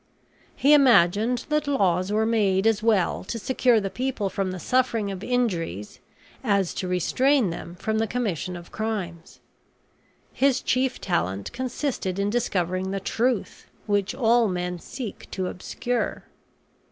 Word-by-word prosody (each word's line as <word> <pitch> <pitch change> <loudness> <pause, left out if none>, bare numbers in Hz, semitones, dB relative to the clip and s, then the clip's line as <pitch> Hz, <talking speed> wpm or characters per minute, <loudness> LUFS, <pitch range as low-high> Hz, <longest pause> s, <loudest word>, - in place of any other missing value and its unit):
He 285 +2 +4
imagined 235 -2 +4
that 300 -1 0
laws 190 -8 +1
were 215 +1 +2
made 205 -4 +2
as 225 -1 +3
well 215 -5 +2
to 230 - -4
secure 245 0 +2
the 195 -2 -3
people 245 -6 -2
from 195 -1 -1
the 185 - -4
suffering 230 -1 +1
of 190 0 -6
injuries 175 - -2 0.4
as 200 -6 +1
to 185 - -3
restrain 235 - +2
them 170 +1 -7
from 220 +4 -1
the 225 - +1
commission 200 -7 -2
of 175 -1 -10
crimes. 190 -7 -5 0.9
His 275 -1 +2
chief 255 +1 0
talent 100 - -2
consisted 250 -6 -3
in 200 +1 0
discovering 185 -5 -1
the 195 0 -2
truth, 230 +2 -1 0.2
which 205 -2 0
all 235 -2 +3
men 180 -1 -3
seek 230 +3 -8
to 185 - -3
obscure. 235 +6 -3
210 Hz, 140 wpm, -25 LUFS, 185-245 Hz, 0.9 s, He